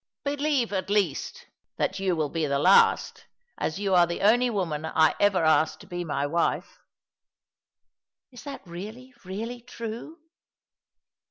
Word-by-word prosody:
" - - -67
Believe, 285 -5 0
at 190 0 -2
least, 200 -8 -1 0.3
that - - -1
you 190 -2 0
will 155 -3 -1
be 160 -2 -1
the 140 0 0
last, 185 +7 +4 0.3
as 155 - -2
you 200 -2 0
are 175 -1 +6
the 170 - -4
only 240 +5 +4
woman 170 -9 -2
I 160 -1 +3
ever 200 -4 +3
asked 155 0 +3
to - - -13
be 175 0 -5
my 145 -4 -2
wife." 165 +4 -1 0.9
" - - -65
Is 245 -3 -12
that 280 -5 -8
really, 215 +9 -9
really 225 +6 -6
true 230 +6 -7
190 Hz, 155 wpm, -26 LUFS, 165-230 Hz, 0.9 s, are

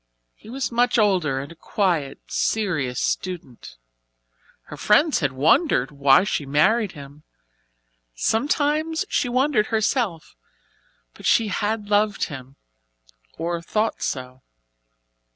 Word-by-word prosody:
He - - -16
was 260 +2 -3
much 240 +1 +2
older 180 - +2
and 140 +3 -7
a - - -12
quiet, 165 -7 -1
serious 155 - -1
student. 160 - -4 0.9
Her - - -10
friends 290 +9 +3
had 145 -4 0
wondered 135 - +2
why 140 +2 +4
she 195 -6 -2
married 190 +10 +2
him 145 +1 -12 0.9
sometimes 295 - 0
she 255 - 0
wondered 255 -3 +1
herself, 220 - -1 0.8
but - - -6
she 225 -2 +3
had 210 +1 -2
loved 205 0 +2
him, 135 0 -10 0.8
or 170 +1 -3
thought 215 +6 -2
so. 130 -1 -4
195 Hz, 115 wpm, -23 LUFS, 145-225 Hz, 0.9 s, why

